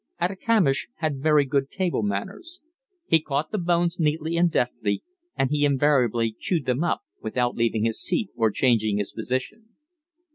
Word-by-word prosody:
Atikamish 185 Hz, -5 st, +1 dB
had 155 Hz, -4 st, -2 dB
very 150 Hz, -1 st, +4 dB
good 135 Hz, 0 st, 0 dB
table 185 Hz, -9 st, -1 dB
manners. 105 Hz, -, -4 dB, 0.5 s
He 160 Hz, -, +3 dB
caught 150 Hz, 0 st, -2 dB
the 210 Hz, -, -1 dB
bones 175 Hz, 0 st, +1 dB
neatly 160 Hz, +1 st, 0 dB
and 170 Hz, +1 st, +3 dB
deftly, 120 Hz, -7 st, -1 dB, 0.3 s
and 135 Hz, 0 st, 0 dB
he 150 Hz, -1 st, +1 dB
invariably 130 Hz, -5 st, +2 dB
chewed 165 Hz, -7 st, -1 dB
them 130 Hz, +5 st, 0 dB
up 175 Hz, -, 0 dB, 0.2 s
without 120 Hz, +2 st, -1 dB
leaving 115 Hz, -2 st, 0 dB
his 115 Hz, -1 st, 0 dB
seat 185 Hz, +3 st, -1 dB
or 115 Hz, -2 st, +2 dB
changing 110 Hz, -3 st, +2 dB
his 105 Hz, -1 st, -3 dB
position. 130 Hz, -, -4 dB
145 Hz, 155 wpm, -25 LUFS, 120-170 Hz, 0.5 s, very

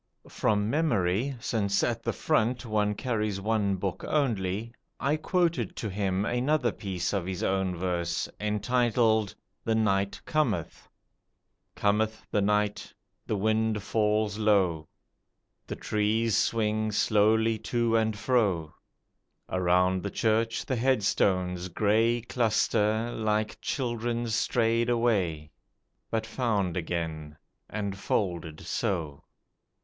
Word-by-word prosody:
From 105 Hz, -1 st, +1 dB
memory 120 Hz, -, +1 dB
since 100 Hz, -4 st, 0 dB
at 115 Hz, -1 st, 0 dB
the -, -, -1 dB
front 125 Hz, -4 st, 0 dB
one 105 Hz, -2 st, 0 dB
carries 105 Hz, -4 st, -1 dB
one 105 Hz, -1 st, +1 dB
book 95 Hz, 0 st, -4 dB
only 115 Hz, -6 st, -1 dB, 0.3 s
I 140 Hz, +3 st, +1 dB
quoted 165 Hz, -, 0 dB
to 110 Hz, -, -4 dB
him 95 Hz, 0 st, 0 dB
another 125 Hz, +1 st, +1 dB
piece 95 Hz, -4 st, -3 dB
of 95 Hz, -3 st, -1 dB
his 95 Hz, -2 st, -3 dB
own 95 Hz, -1 st, 0 dB
verse, 85 Hz, -1 st, -1 dB
entitled 110 Hz, 0 st, +1 dB, 0.3 s
"The 115 Hz, -, +1 dB
Night 100 Hz, -3 st, +1 dB
Cometh": 150 Hz, -, -1 dB, 0.9 s
"Cometh 110 Hz, +1 st, 0 dB
the 105 Hz, -, +2 dB
night. 105 Hz, 0 st, 0 dB, 0.4 s
The 110 Hz, -, 0 dB
wind 110 Hz, 0 st, +1 dB
falls 105 Hz, 0 st, 0 dB
low, 95 Hz, -8 st, +2 dB, 0.8 s
The -, -, -4 dB
trees 110 Hz, +1 st, 0 dB
swing 110 Hz, -1 st, +1 dB
slowly 110 Hz, +2 st, +3 dB
to 115 Hz, +1 st, 0 dB
and 110 Hz, -1 st, +1 dB
fro; 100 Hz, -11 st, +1 dB, 0.8 s
Around 90 Hz, 0 st, +2 dB
the 100 Hz, -, -3 dB
church 115 Hz, +2 st, 0 dB
the 130 Hz, -, -1 dB
headstones 95 Hz, -7 st, +1 dB
grey 110 Hz, +6 st, +2 dB
Cluster, 110 Hz, -1 st, +1 dB
like 110 Hz, 0 st, -1 dB
children 120 Hz, -2 st, -2 dB
stray'd 115 Hz, +1 st, +1 dB
away, 95 Hz, -11 st, 0 dB, 0.6 s
But 110 Hz, -1 st, -1 dB
found 110 Hz, -7 st, -1 dB
again, 80 Hz, -3 st, -4 dB, 0.3 s
and 100 Hz, -2 st, -3 dB
folded 85 Hz, -5 st, -2 dB
so." 80 Hz, -7 st, -3 dB
105 Hz, 115 wpm, -28 LUFS, 95-115 Hz, 0.9 s, slowly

